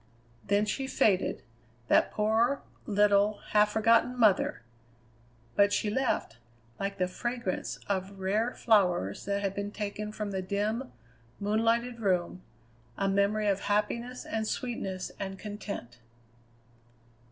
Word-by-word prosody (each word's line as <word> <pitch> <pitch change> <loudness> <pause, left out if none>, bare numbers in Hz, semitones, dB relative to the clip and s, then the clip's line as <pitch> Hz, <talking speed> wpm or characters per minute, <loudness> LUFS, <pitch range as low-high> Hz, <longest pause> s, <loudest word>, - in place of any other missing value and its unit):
Then 205 +1 +2
she 265 +5 -2
faded, 215 -9 +1 0.4
that - - +4
poor, 225 +6 +1 0.2
little, 205 0 +3
half 210 0 +5
forgotten 230 +3 +3
mother! 205 - +3 0.9
But 200 0 +5
she 205 +1 0
left, 245 - -1 0.4
like 195 0 -3
the 180 - +1
fragrance 240 +1 -3
of 195 0 -2
rare 210 +6 0
flowers 180 - +2
that 200 0 -1
had 195 -1 0
been 200 +1 -3
taken 210 0 -4
from 210 -1 -4
the 190 -1 -2
dim, 210 +7 -2 0.5
moon 210 +2 +1
lighted 235 +1 +1
room, 185 -3 0 0.6
a 195 - 0
memory 200 +2 +2
of 200 -1 +2
happiness 235 +4 -1
and 220 -1 -2
sweetness 195 -8 -3
and 195 -1 -4
content. 200 - -7
205 Hz, 125 wpm, -29 LUFS, 195-220 Hz, 0.9 s, half